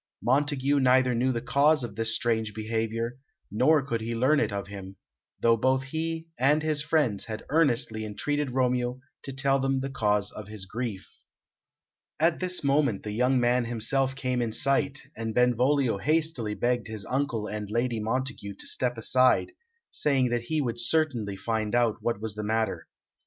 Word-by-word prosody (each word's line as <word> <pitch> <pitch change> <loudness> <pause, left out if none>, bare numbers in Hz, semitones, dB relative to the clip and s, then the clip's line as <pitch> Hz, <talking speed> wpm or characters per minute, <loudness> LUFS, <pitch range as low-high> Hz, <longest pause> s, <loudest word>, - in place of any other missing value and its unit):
Montague 140 +1 +2
neither 130 -1 +4
knew 125 +3 +1
the 120 -1 -3
cause 145 +2 +3
of 115 -3 -5
this 110 0 0
strange 110 -3 -1
behaviour, 115 +2 -2 0.3
nor 135 +7 +3
could 115 -4 -2
he 115 +1 -3
learn 135 +6 +3
it 110 - 0
of 100 0 -3
him, 95 -1 -9 0.4
though 115 0 +4
both 130 +3 +1
he 160 +3 -3
and 145 +4 +3
his 155 -2 +2
friends 145 -9 +1
had 110 -1 -6
earnestly 125 -8 +1
entreated 145 +7 -2
Romeo 125 -1 0 0.2
to 135 - -7
tell 135 0 +1
them 135 0 0
the 135 +1 -4
cause 105 -4 0
of 105 -2 -9
his 105 -2 -8
grief. 110 -1 -5 1.1
At 165 +1 +2
this 180 -2 -1
moment 140 -7 +1
the 105 - -4
young 125 +4 +2
man 120 0 +2
himself 130 +4 0
came 125 -2 -1
in 115 -2 -2
sight, 140 +3 +1
and 115 0 -4
Benvolio 125 -1 +2
hastily 150 -6 0
begged 120 0 0
his 110 -2 -6
uncle 125 -5 -1
and 105 -1 -5
Lady 120 +1 0
Montague 115 -2 -3
to - - -7
step 125 -2 -1
aside, 125 - +3 0.4
saying 135 -4 +1
that 120 0 0
he 150 +6 -1
would 120 -3 -3
certainly 120 -8 0
find 110 +2 -2
out 120 -3 +2
what 115 -4 -1
was 110 -1 -3
the 105 0 -5
matter. 110 +1 -1
125 Hz, 175 wpm, -27 LUFS, 110-135 Hz, 1.1 s, neither